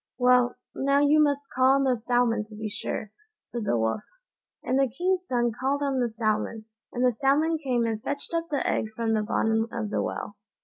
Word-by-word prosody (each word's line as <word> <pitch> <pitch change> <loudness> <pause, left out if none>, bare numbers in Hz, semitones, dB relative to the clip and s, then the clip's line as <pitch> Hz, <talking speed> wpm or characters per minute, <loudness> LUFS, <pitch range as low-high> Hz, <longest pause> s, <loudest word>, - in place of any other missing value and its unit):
"Well, 250 -1 +4 0.2
now 275 +1 +2
you 290 +1 +4
must 285 -1 0
call 260 +1 +4
on 275 - +2
the 260 -2 +2
salmon 240 -1 +1
to 215 0 -13
be 215 +1 -4
sure," 210 0 -4 0.3
said 235 -3 -5
the 120 - +1
Wolf; 110 - 0 0.6
and 260 +2 +1
the 270 -1 +3
king's 365 +7 -1
son 240 -1 +1
called 270 +5 -1
on 275 -2 0
the 240 -1 +1
salmon, 220 0 -2 0.3
and 245 +1 0
the 250 - +3
salmon 295 +7 +2
came 250 -5 0
and 220 -1 -2
fetched 285 +6 -5
up 335 0 -1
the 285 -3 -1
egg - - 0
from 225 -1 0
the 215 - +2
bottom 225 +1 +1
of 220 -3 -4
the - - 0
well. 205 - -4
245 Hz, 210 wpm, -26 LUFS, 225-275 Hz, 0.6 s, Well